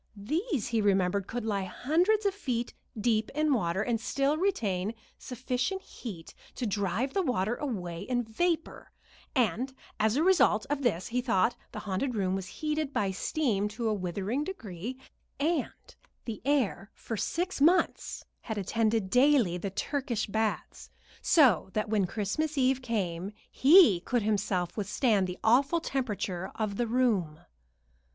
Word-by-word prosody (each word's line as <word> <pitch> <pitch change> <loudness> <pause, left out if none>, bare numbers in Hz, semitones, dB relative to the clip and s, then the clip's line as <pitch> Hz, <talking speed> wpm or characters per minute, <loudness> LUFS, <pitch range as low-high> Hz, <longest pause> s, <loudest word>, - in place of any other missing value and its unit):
These, 295 - -2
he 230 -2 +1
remembered, 195 -1 +2
could 240 -1 -4
lie 200 -3 -1
hundreds 350 - +1
of 400 - +2
feet 245 - -3 0.3
deep 220 -1 +1
in 305 -1 +2
water, 190 -4 0
and 225 -1 -1
still 275 +5 +1
retain 225 - -1 0.2
sufficient 255 - -3
heat 185 -9 -9 0.2
to 250 - -3
drive 205 +5 -1
the 390 - +2
water 240 - 0
away 180 - -4
in 245 +4 -1
vapor; 325 +9 -2 0.4
and 250 +1 +1 0.3
as 215 +1 +2
a 300 - +2
result 350 - +4
of 290 -1 0
this 220 -5 0
thought 240 -3 +2 0.2
the - - -8
haunted 210 +6 -2
room 190 -3 0
was 190 -1 -3
heated 305 - -2
by 200 -7 0
steam 210 0 0
to 225 +2 -3
a - - +1
withering 200 - -2
degree, 235 - -6 0.4
and 305 -1 +1 0.6
the 225 -4 -5
heir 245 -9 +1
for 225 - -5
six 345 - -2
months 345 +5 +2 0.2
attended 220 -1 0
daily 250 -8 +4
the 200 - -3
Turkish 240 +3 -2
baths, 220 +1 -3 0.3
so 250 - +4
that 215 0 -1
when 205 -4 +2
Christmas 225 - -2
Eve 265 0 +2
came 195 -6 -2 0.2
he 290 - +7
could 235 +5 -1
himself 195 -4 0
withstand 210 -1 +1
the 180 - -5
awful 275 +9 +4
temperature 210 - -3
of 215 -2 -2
the 240 - 0
room. 215 -11 +1
225 Hz, 145 wpm, -29 LUFS, 200-275 Hz, 0.6 s, he